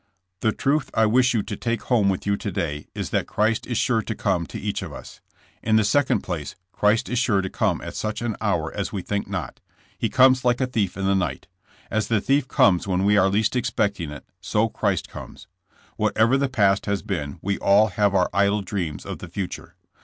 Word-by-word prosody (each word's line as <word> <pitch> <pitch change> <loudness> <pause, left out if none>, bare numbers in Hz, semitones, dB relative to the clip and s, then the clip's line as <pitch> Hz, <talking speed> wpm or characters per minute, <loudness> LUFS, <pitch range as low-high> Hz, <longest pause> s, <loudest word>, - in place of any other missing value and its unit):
The 110 - +2
truth 140 +4 0
I 110 - +4
wish 125 +3 +3
you 105 - +1
to 105 - -5
take 115 0 -2
home 110 -6 +2
with 95 - -2
you 100 0 +2
to 100 - -4
day 75 -4 -3
is - - -4
that - - 0
Christ 110 +1 0
is 120 - -2
sure 115 -1 +2
to 110 - -5
come 90 -6 0
to - - -7
each - - -3
of - - -6
us. - - -11 0.4
In 110 0 +2
the 110 - +4
second 140 +6 +2
place, 80 -6 -5 0.2
Christ 105 +5 +2
is 125 - 0
sure 105 -6 +2
to 95 - -4
come - - 0
at - - -7
such 110 +2 -3
an 115 -3 -2
hour - - -1
as - - -3
we 95 -3 -4
think 100 -1 -2
not. 95 -3 -5 0.4
He - - -1
comes 130 0 +5
like 120 -1 +2
a 130 - +2
thief 110 -8 -2
in 95 - -2
the 100 - +3
night. 90 -9 -1 0.5
As 110 0 0
the 110 -2 +2
thief 135 +4 +1
comes 95 -7 +3
when 95 0 0
we 105 +1 +4
are 95 -1 +4
least 105 +5 +1
expecting 100 -8 -1
it, 75 -1 -9 0.2
so 110 +1 +1
Christ 100 -5 -1
comes. - - -10 0.5
Whatever 115 +4 +2
the 140 0 +1
past 100 -6 +2
has 100 -1 -1
been, 80 -6 -4
we 100 0 -1
all 105 +2 +4
have 100 +1 +1
our 90 -1 +3
idle 100 +1 +2
dreams 90 -6 -4
of - - -6
the 90 - -8
future. 90 +1 -6
105 Hz, 225 wpm, -23 LUFS, 95-115 Hz, 0.5 s, comes